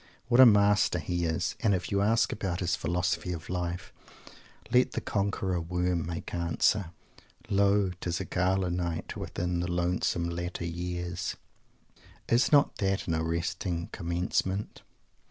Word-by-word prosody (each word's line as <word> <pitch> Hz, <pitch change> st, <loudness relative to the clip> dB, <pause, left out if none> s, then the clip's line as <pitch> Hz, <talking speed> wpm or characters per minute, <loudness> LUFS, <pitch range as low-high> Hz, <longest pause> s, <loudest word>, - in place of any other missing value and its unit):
What 120 Hz, 0 st, +4 dB
a 130 Hz, -, +11 dB
master 105 Hz, -3 st, +4 dB
he 85 Hz, 0 st, -2 dB
is! 80 Hz, +4 st, -1 dB
And 110 Hz, -4 st, +3 dB
if 90 Hz, -1 st, -4 dB
you 100 Hz, 0 st, +2 dB
ask 115 Hz, +3 st, +3 dB
about 95 Hz, -5 st, -3 dB
his 85 Hz, -1 st, +1 dB
"philosophy 90 Hz, +2 st, -1 dB
of 85 Hz, -1 st, -8 dB
life," 90 Hz, -1 st, -3 dB, 0.8 s
let 125 Hz, 0 st, +4 dB
the -, -, -1 dB
Conqueror 100 Hz, -3 st, -1 dB
Worm 90 Hz, 0 st, -1 dB
make 85 Hz, -1 st, -5 dB
answer: 85 Hz, +2 st, +1 dB, 0.6 s
"Lo! 100 Hz, -1 st, +3 dB
Tis 85 Hz, 0 st, -2 dB
a 95 Hz, -, -3 dB
Gala 90 Hz, +1 st, +1 dB
Night 85 Hz, -2 st, -3 dB
Within 90 Hz, 0 st, -3 dB
the 90 Hz, 0 st, -2 dB
lonesome 85 Hz, -1 st, 0 dB
latter 85 Hz, 0 st, -4 dB
years 90 Hz, +1 st, -4 dB, 0.4 s
" -, -, -27 dB
Is 120 Hz, +2 st, +3 dB
not 145 Hz, -1 st, +4 dB
that 95 Hz, -2 st, -1 dB
an 85 Hz, -, 0 dB
arresting 85 Hz, +1 st, -2 dB
commencement? 90 Hz, +3 st, -2 dB
90 Hz, 145 wpm, -29 LUFS, 85-100 Hz, 0.8 s, a